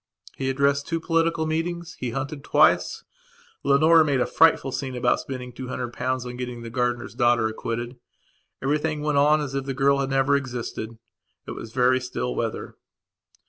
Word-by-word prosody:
He 135 0 -2
addressed 140 +1 +1
two 165 -1 -1
political 165 -1 +1
meetings; 170 +2 -3
he 125 - -2
hunted 140 +4 -4
twice. - - +3 0.6
Leonora 155 +4 +5
made 145 -3 +1
him 130 - +1
a - - +3
frightful 165 -4 +3
scene 130 0 -4
about 125 0 +2
spending 125 -2 -6
the - - -26
two 130 0 -6
hundred 125 -1 -4
pounds 130 0 -2
on 125 0 -6
getting 125 -1 -5
the 115 - -7
gardener's 120 -3 -1
daughter 120 -2 +3
acquitted. 115 +2 -4 0.7
Everything 150 +2 0
went 150 -2 +2
on 150 +2 +4
as 140 -2 -4
if 135 -1 -2
the 135 -1 -3
girl 140 +1 +3
had 135 -1 -1
never 135 +1 +2
existed. 120 -4 -4 0.5
It - - -7
was 110 - -8
very 125 +1 +3
still 60 - -3
weather. - - -4
135 Hz, 180 wpm, -24 LUFS, 125-145 Hz, 0.7 s, Leonora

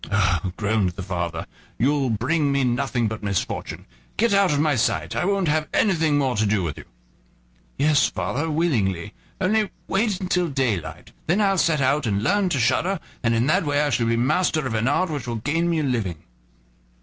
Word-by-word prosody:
"Oh!" 95 -2 +1
groaned 100 -3 0
the 95 - -7
father, 85 -3 -3 0.3
"you'll 140 0 +1
bring 140 +7 0
me 140 -1 +1
nothing 120 -1 0
but 110 0 -5
misfortune; 100 -2 -3 0.3
get 230 -1 +2
out 200 -3 +4
of 145 - +1
my 150 -1 +2
sight, 80 -8 0
I - - 0
won't 195 -2 +1
have 155 0 +1
anything 160 -7 +2
more 135 -3 +1
to 110 - +2
do 100 -2 +1
with 75 -5 -4
you." - - -11 0.9
"Yes, 150 0 +3
father, 120 - -2
willingly; 115 - 0 0.3
only 210 +2 +1 0.2
wait 200 -1 0
till 180 -1 +2
daylight, 100 - -2 0.2
then 175 +6 +2
I'll 195 -3 +2
set 160 -4 +2
out 140 0 +1
and 100 -1 0
learn 200 - +2
to 140 - 0
shudder, 180 +9 +1 0.2
and 115 -1 +1
in 115 +2 +2
that 180 +6 +2
way 145 -1 0
I 145 -1 +1
shall 120 -2 +1
be 115 0 +1
master 155 +4 +1
of 125 - -2
an 110 +1 0
art 165 +5 +1
which 140 -5 -4
will 120 - -2
gain 155 +9 -1
me 165 -2 +1
a - - -2
living." 105 - -2
135 Hz, 195 wpm, -23 LUFS, 110-165 Hz, 0.9 s, out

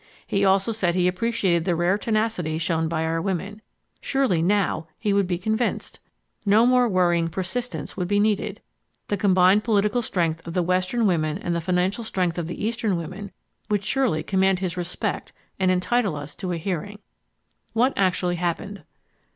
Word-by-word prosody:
He 200 - 0
also 195 +2 +3
said 185 -6 0
he 180 -1 +3
appreciated 185 -3 +1
the 175 0 0
rare 175 +3 +2
tenacity 215 -7 -1
shown 160 0 0
by 160 0 -1
our 165 0 -1
women. 195 +3 -3 0.4
Surely 265 - +1
"now" 180 -3 +1
he 210 -2 0
would 200 -2 +2
be 175 -1 -1
convinced! 220 +6 -2 0.4
No 215 +2 +5
more 250 -1 +4
worrying 175 -3 +2
persistence 185 0 -4
would 180 - -2
be 205 +2 +2
needed! 210 -1 0 0.5
The 205 - 0
combined 190 +1 +4
political 210 +1 +2
strength 165 -6 -1
of 170 - -6
the 180 - +2
western 185 +6 +1
women 155 -4 +1
and 175 -3 -2
the 170 - -1
financial 180 +6 0
strength 180 -5 -1
of 165 - -3
the 175 - -4
eastern 220 -4 0
women 185 +5 -7 0.4
would 205 -1 0
surely 230 - +1
command 190 -1 +2
his 180 -2 -3
respect 180 0 -3 0.3
and 190 -1 +2
entitle 185 +1 +1
us 145 0 -7
to 185 -2 -4
a 175 - -1
hearing. 195 +4 -4 0.8
What 250 +4 +3
actually 180 -2 +1
happened? 180 +4 -3
185 Hz, 170 wpm, -24 LUFS, 175-210 Hz, 0.8 s, No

